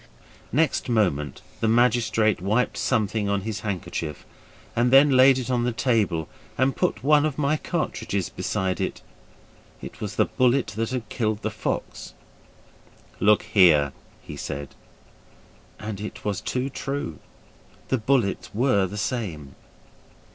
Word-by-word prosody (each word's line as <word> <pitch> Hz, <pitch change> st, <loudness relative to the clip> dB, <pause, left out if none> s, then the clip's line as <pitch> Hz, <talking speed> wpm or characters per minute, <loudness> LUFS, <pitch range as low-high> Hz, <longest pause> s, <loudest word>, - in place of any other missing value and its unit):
Next 150 Hz, 0 st, +1 dB
moment 90 Hz, -, 0 dB, 0.2 s
the 115 Hz, -, +1 dB
magistrate 115 Hz, -3 st, +2 dB
wiped 110 Hz, +6 st, +1 dB
something 105 Hz, -1 st, 0 dB
on 100 Hz, -1 st, 0 dB
his 110 Hz, +1 st, -4 dB
handkerchief 85 Hz, -6 st, -4 dB, 0.5 s
and 120 Hz, +1 st, +3 dB
then 135 Hz, +3 st, +7 dB
laid 130 Hz, 0 st, +6 dB
it 130 Hz, 0 st, -3 dB
on 120 Hz, -1 st, +1 dB
the 125 Hz, -, +1 dB
table, 105 Hz, -, 0 dB, 0.3 s
and 130 Hz, +2 st, +2 dB
put 180 Hz, -, -1 dB
one 150 Hz, +1 st, +5 dB
of 155 Hz, -3 st, -1 dB
my 150 Hz, 0 st, +2 dB
cartridges 150 Hz, -, -2 dB
beside 95 Hz, -1 st, -2 dB
it. -, -, -3 dB, 0.8 s
It -, -, -10 dB
was -, -, -4 dB
the -, -, +3 dB
bullet 125 Hz, -2 st, +1 dB
that 115 Hz, +1 st, -1 dB
had 125 Hz, -3 st, -4 dB
killed 110 Hz, -2 st, -2 dB
the 110 Hz, -, -1 dB
fox. 110 Hz, -, -4 dB, 1.0 s
'Look 105 Hz, +1 st, +4 dB
here!' 75 Hz, -8 st, +4 dB, 0.3 s
he -, -, -8 dB
said. 70 Hz, 0 st, -6 dB, 1.0 s
And 105 Hz, -1 st, -6 dB
it 105 Hz, -, -7 dB
was 105 Hz, -2 st, -1 dB
too 130 Hz, +2 st, -2 dB
true. 135 Hz, -, -4 dB, 0.7 s
The 130 Hz, -, +1 dB
bullets 110 Hz, -3 st, 0 dB
were 110 Hz, -5 st, +2 dB
the 105 Hz, +3 st, -7 dB
same. 90 Hz, -, -3 dB
110 Hz, 140 wpm, -24 LUFS, 100-130 Hz, 1.0 s, then